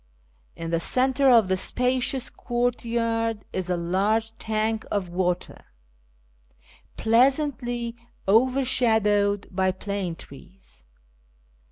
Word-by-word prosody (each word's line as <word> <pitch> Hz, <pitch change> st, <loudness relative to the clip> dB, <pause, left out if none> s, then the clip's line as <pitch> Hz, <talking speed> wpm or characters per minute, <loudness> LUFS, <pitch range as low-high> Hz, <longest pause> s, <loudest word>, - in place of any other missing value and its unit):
In 165 Hz, 0 st, -6 dB
llic 165 Hz, 0 st, 0 dB
centre 265 Hz, +6 st, +2 dB
of 230 Hz, -5 st, +6 dB
the 190 Hz, -, +1 dB
spacious 255 Hz, +5 st, 0 dB
courtyard 230 Hz, -2 st, -1 dB
is 185 Hz, -1 st, -3 dB
a 180 Hz, -, 0 dB
large 205 Hz, +6 st, 0 dB
tank 220 Hz, 0 st, -1 dB
of 195 Hz, -4 st, -2 dB
water, 180 Hz, 0 st, -2 dB, 1.3 s
pleasantly 240 Hz, -1 st, +1 dB, 0.3 s
overshadowed 220 Hz, -4 st, +2 dB
by 190 Hz, 0 st, +1 dB
plane 190 Hz, -2 st, -4 dB
trees. 180 Hz, -, -15 dB
220 Hz, 90 wpm, -25 LUFS, 190-245 Hz, 1.3 s, of